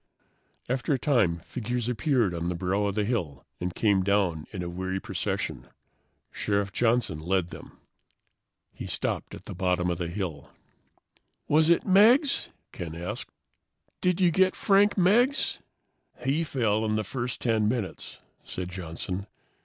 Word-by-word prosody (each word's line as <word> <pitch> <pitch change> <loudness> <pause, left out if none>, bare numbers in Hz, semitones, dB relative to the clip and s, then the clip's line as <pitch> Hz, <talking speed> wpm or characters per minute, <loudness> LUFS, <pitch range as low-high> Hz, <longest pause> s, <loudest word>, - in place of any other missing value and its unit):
After 130 +3 0
a - - 0
time, 105 - +2
figures 120 +2 -3
appeared 125 - +1
on 85 0 -2
the 90 - -2
brow 95 +4 0
of 100 -1 -1
the 105 - +1
hill 85 - -2
and 90 0 -2
came 100 -3 +3
down 95 -5 +1
in 90 -3 -4
a - - -4
weary 95 +2 -3
procession. 100 -2 -3 0.6
Sheriff 100 -1 -1
Johnson 115 -8 +1
led 90 +1 0
them. - - -11 1.0
He - - -7
stopped - - -3
at - - -13
the - - -6
bottom 90 -1 0
of 85 - -3
the 85 - -2
hill. 85 -5 -5 1.0
"Was 155 +2 +4
it 170 - +4
Meggs?" 230 - +5 0.2
Ken 85 -3 -6
asked. 90 +7 -5 0.7
"Did 180 0 +2
you 180 -2 +4
get 190 +2 +3
Frank 200 +1 +3
Meggs?" 235 +9 +3 0.7
"He 145 +5 +2
fell 110 -8 0
in 110 -1 0
the 110 - 0
first 125 0 -4
10 110 -3 +1
minutes," 110 -4 -3 0.2
said 90 -1 -5
Johnson. 90 +2 -5
105 Hz, 150 wpm, -27 LUFS, 90-130 Hz, 1.0 s, Meggs